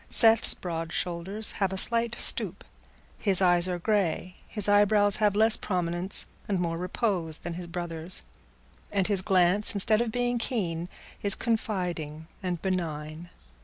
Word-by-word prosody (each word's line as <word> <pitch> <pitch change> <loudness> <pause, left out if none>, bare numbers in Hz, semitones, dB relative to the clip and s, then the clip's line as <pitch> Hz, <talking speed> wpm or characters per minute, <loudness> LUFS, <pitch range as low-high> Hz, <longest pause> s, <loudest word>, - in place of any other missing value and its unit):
Seth's 225 -1 +4
broad 165 -2 -5
shoulders 180 +6 0
have 195 -2 -1
a 190 - -4
slight 235 +3 +2
stoop; - - +2 0.6
his 195 -3 +1
eyes 175 -1 +3
are 180 -1 -2
grey; 185 -2 -1
his 210 -3 +1
eyebrows 205 0 +3
have 210 -2 +2
less 220 +1 +6
prominence 180 0 -3 0.2
and 195 -3 -1
more 170 -2 -1
repose 180 -4 -1
than 175 - -6
his 175 +1 -7
brother's; 170 0 -5 0.7
and 195 -2 0
his 200 -2 +2
glance, 190 +2 +2
instead 215 +3 +4
of 235 -2 -2
being 245 0 -1
keen, 180 -8 -3 0.3
is 200 -1 +5
confiding 180 -9 -3 0.2
and 180 -3 -4
benign. 165 -3 -4
185 Hz, 145 wpm, -27 LUFS, 175-210 Hz, 0.7 s, less